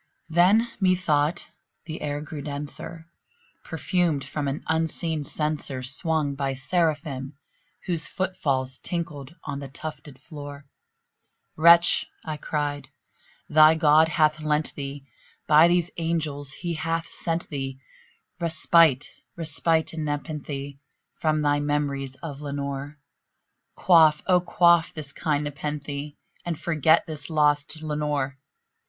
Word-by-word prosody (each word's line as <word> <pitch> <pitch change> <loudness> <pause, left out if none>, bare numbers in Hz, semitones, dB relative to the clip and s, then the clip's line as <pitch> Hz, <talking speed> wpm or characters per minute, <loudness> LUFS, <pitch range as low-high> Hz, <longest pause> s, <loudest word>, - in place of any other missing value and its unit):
Then, 185 +8 +4
methought, 175 -5 +1 0.4
the 160 -1 -7
air 145 0 -3
grew 155 -1 -7
denser, 150 +3 -6 0.6
perfumed 170 -7 0
from 145 -2 -3
an 140 +2 -3
unseen 160 -1 -1
censer 150 -3 -2
Swung 145 +2 +1
by 135 -1 -2
Seraphim 145 -2 -1 0.5
whose 170 -4 0
foot 190 0 -3
falls 130 -5 -1
tinkled 165 -4 -5
on 140 -1 -5
the 140 - -7
tufted 150 0 -8
floor. 145 -2 -9 0.9
"Wretch," 170 +2 +6 0.2
I 155 -2 -4
cried, 145 -1 -3 0.6
"thy 155 +1 +6
God 160 0 +5
hath 155 -1 +2
lent 150 0 0
thee 140 -1 -6 0.4
by 155 +2 +7
these 175 0 +1
angels 155 -4 -2
he 170 +5 -4
hath 165 +1 -2
sent 165 0 -3
thee 135 -3 -4 0.6
Respite 165 -4 +4 0.3
respite 160 0 0
aad 165 - -5
nepenthé 145 -2 -4 0.4
from 155 -1 +1
thy 145 0 +2
memories 145 -2 -2
of 145 -3 -6
Lenore! 140 0 -5 0.8
Quaff, 160 -4 +5
oh 180 -1 +4
quaff 170 -1 +4
this 145 -3 -6
kind 150 -2 -1
nepenthé, 145 0 -5 0.3
and 170 -3 -4
forget 160 0 +3
this 150 -2 -4
lost 150 0 +1
Lenore!" 150 -3 -2
150 Hz, 120 wpm, -25 LUFS, 145-165 Hz, 0.9 s, by